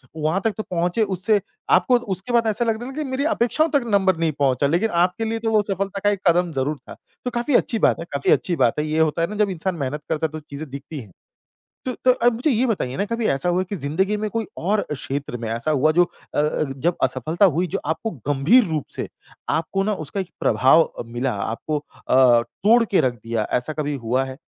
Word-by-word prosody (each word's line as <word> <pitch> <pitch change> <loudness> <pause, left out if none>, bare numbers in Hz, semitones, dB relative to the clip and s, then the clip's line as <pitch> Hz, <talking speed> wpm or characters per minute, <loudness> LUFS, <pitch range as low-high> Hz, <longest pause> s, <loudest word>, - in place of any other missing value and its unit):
वहाँ 155 +5 0
तक 220 - +2
तो 215 - -3
पहुँचे 180 +5 0
उससे 200 +1 +1 0.3
आपको 185 +8 +5 0.2
उसके 200 +7 -5
बाद 230 -1 +3
ऐसा 220 +3 +1
लगने 225 +1 -1
लगा 280 +4 -4
कि 270 - -6
मेरी 270 +3 -1
अपेक्षाओं 315 +1 +1
तक 280 -4 +3
नंबर 190 -4 +2
नहीं 165 -1 +1
पहुँचा। 140 0 +2
लेकिन 175 +9 +1
आपके 225 +5 -1
लिए 225 +1 -2
तो 225 0 -1
वो 215 -1 +4
सफलता 195 0 -3
का 205 - +4
एक 200 -2 -1
कदम 175 0 +3
ज़रूर 140 +3 -1
था। - - -8 0.3
तो 250 - -1
काफ़ी 240 +3 0
अच्छी 225 -3 +2
बात - - +4
है, 165 - -5
काफ़ी 140 -1 +1
अच्छी 175 - +2
बात 120 +1 +2
है। 150 - 0
ये 155 +1 -1
होता 160 +1 +2
है 165 - +2
ना 210 - -6
जब 205 -1 +2
इंसान 185 0 -2
मेहनत 150 0 -3
करता 160 0 0
है - - -19
तो 155 - -6
चीज़ें 145 0 -8
दिखती 140 +2 -7
हैं। 105 -6 -11 0.7
तो 255 - -2
तो 255 - +7
अब 240 -1 +2
मुझे 255 +6 0
ये 250 +2 +2
बताइए 135 - -2
ना 200 - 0
कभी 230 0 -1
ऐसा 135 +6 -2
हुआ 180 +1 +2
कि 195 +2 -5
ज़िंदगी 180 +8 0
में 215 0 -2
कोई 225 -3 -2
और 205 +4 0
क्षेत्र 140 -2 -4
में 115 -1 -5
ऐसा 115 +7 -2
हुआ 155 +2 +3
जो 175 +2 +5
अ, - - -10
अ, 150 +1 0
जब 170 +6 0
असफलता 145 - +1
हुई 180 +1 +1
जो - - +1
आपको 165 +8 -2 0.2
गंभीर 150 - +5
रूप 155 -3 -2
से - - -4 0.4
आपको 165 +5 0
ना 215 - 0
उसका 195 +7 -2
एक 185 - -6
प्रभाव 145 +5 +4
मिला, 120 +2 -2
आपको 115 +9 -3
अ, 130 -4 +3
तोड़ 230 - +2
के 200 - +2
रख 125 -2 +1
दिया। 115 -2 -1
ऐसा 140 +6 -6
कभी 150 -1 -2
हुआ 130 +3 +1
है? 130 0 -8
175 Hz, 235 wpm, -22 LUFS, 145-215 Hz, 0.7 s, तो